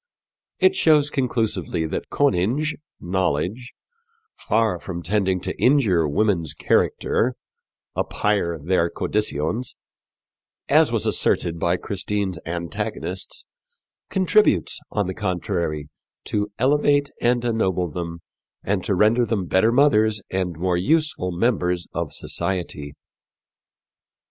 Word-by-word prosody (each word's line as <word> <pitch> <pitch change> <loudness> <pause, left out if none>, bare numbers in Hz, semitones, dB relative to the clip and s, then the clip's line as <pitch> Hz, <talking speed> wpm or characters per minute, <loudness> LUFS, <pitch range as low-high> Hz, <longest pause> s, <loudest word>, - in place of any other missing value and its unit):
It 375 0 +4
shows 150 - +4
conclusively 110 - -1
that 80 - -4
conynge 140 - +1 0.3
knowledge 95 - -1 0.6
far 110 -4 0
from 85 -1 -6
tending 95 -1 +1
to - - -3
injure 110 - +4
women's 85 -1 0
character 125 +2 +1 0.6
apayre 100 -5 0
theyr 90 -2 +2
condycyons 105 - -2 0.9
as - - +4
was - - +1
asserted 85 -1 +1
by 85 +2 +1
Christine's 100 -2 -3
antagonists, 85 +1 -4 0.6
contributes, 185 - +2
on 105 -1 -1
the 95 - -3
contrary, 85 -6 -2 0.4
to 105 0 -2
elevate 145 +2 +2
and 120 0 +2
ennoble 95 -6 0
them 85 +1 -6 0.4
and 95 -1 -1
to 100 - +1
render 110 +6 +4
them 105 -4 -1
better 95 +6 +3
mothers 110 -5 +4
and 90 -3 -2
more 90 +1 0
useful 150 - +1
members 90 -3 0
of 85 -3 -3
society. 75 -6 -4
95 Hz, 105 wpm, -23 LUFS, 85-120 Hz, 0.9 s, It